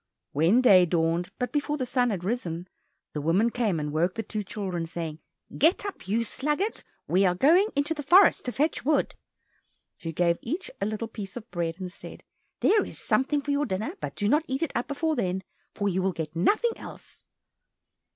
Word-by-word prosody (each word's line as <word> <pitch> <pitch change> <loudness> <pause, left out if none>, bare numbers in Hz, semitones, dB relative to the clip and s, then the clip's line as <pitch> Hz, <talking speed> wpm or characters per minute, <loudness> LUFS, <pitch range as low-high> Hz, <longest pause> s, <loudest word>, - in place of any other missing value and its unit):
When 170 - +4
day 185 -8 +7
dawned, 165 +1 +1
but 250 - -2
before 295 0 -1
the 260 - -2
sun 245 0 +1
had 190 -5 -3
risen, 180 -5 -3 0.5
the 150 - -3
woman 185 +10 +2
came 215 -9 0
and 150 0 -3
awoke 170 +5 0
the 225 - -3
two 215 -1 -3
children, 185 -4 -4
saying 165 -2 -5 0.4
"Get 335 +6 +3
up, 400 - -7
you 225 +4 +1
sluggards! 300 - -2 0.2
we 185 +3 +3
are 180 -2 +3
going 335 - +5
into 285 +3 +1
the 300 - -5
forest 355 +7 +6
to 250 - -2
fetch 300 +6 0
wood." 300 +1 +1 0.8
She 165 - -5
gave 170 +1 +1
each 330 +11 -4
a 200 - +1
little 215 +1 -3
piece 210 -1 -7
of 235 -1 -8
bread, 170 0 -2
and 185 -1 -5
said, - - -10 0.4
"There 425 0 +4
is - - -7
something 285 +2 +1
for 285 - -2
your 285 0 +1
dinner, 215 - -2
but - - -5
do 205 - -1
not 300 +8 +3
eat 265 +4 -1
it 325 - -2
up 240 - -1
before 315 +2 -1
then, 190 -5 -1 0.3
for 205 - -1
you 190 -1 0
will 190 0 0
get 160 -1 -5
nothing 435 - +2
else." - - -11
215 Hz, 200 wpm, -27 LUFS, 175-285 Hz, 0.8 s, day